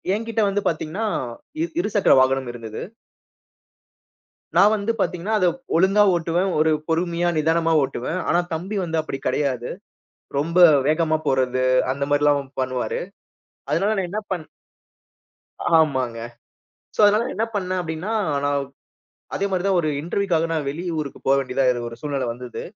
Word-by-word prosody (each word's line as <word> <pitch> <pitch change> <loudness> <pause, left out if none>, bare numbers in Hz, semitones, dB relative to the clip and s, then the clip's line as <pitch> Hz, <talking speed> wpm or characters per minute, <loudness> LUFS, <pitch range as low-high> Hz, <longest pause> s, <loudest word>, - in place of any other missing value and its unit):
என்கிட்ட 225 +1 -2
வந்து 200 +1 0
பாத்தீங்கன்னா, 165 +6 -2 0.6
இ - - +2 0.2
இருசக்கர 205 - +3
வாகனம் 130 -1 +1
இருந்தது. 115 -2 -7 1.8
நான் 205 - +7
வந்து 210 +2 -1
பாத்தீங்கன்னா, 180 +5 -1
அத 185 - +3 0.3
ஒழுங்கா 195 +4 +5
ஓட்டுவேன். 170 +2 0
ஒரு 155 +1 +3 0.2
பொறுமையா, 170 +1 0
நிதானமா 165 +1 +2
ஓட்டுவேன். 135 +6 -3
ஆனா 175 - +3
தம்பி 190 +6 -3
வந்து 165 -2 -1
அப்படி 135 -3 -6
கிடையாது. 130 -4 -1 0.7
ரொம்ப 165 +5 +1 0.3
வேகமா 155 0 +2
போறது, 130 -1 +1 0.3
அந்த 140 +1 -2
மாரிலாம் 145 -2 +2
பண்ணுவாரு. 130 -1 -2 0.7
அதனால 195 +8 +2
நான் 190 -2 -1
என்ன 210 - -2
பண் 175 -4 -3 1.3
ஆமாங்க. 130 -7 +1 0.8
சோ - - -14
அதனால 210 +2 +4
நான் - - -4
என்ன 220 +4 0
பண்ணேன் 185 -2 -1
அப்படின்னா, 160 +4 -4 0.3
நான் 145 -1 +1 0.7
அதே 200 - 0
மாரி 185 -2 0
தான் 195 -1 +2
ஒரு 155 - -1
இன்டர்வியூக்காக 170 0 0
நான் 155 -3 -1
வெளி 165 +5 -6
ஊருக்கு 145 -3 -5
போவேண்டியதா 135 -1 +2 0.2
ஒரு 115 - -9
சூழ்நிலை 140 -3 -2
வந்தது. 125 +1 -7
160 Hz, 135 wpm, -22 LUFS, 140-185 Hz, 1.8 s, நான்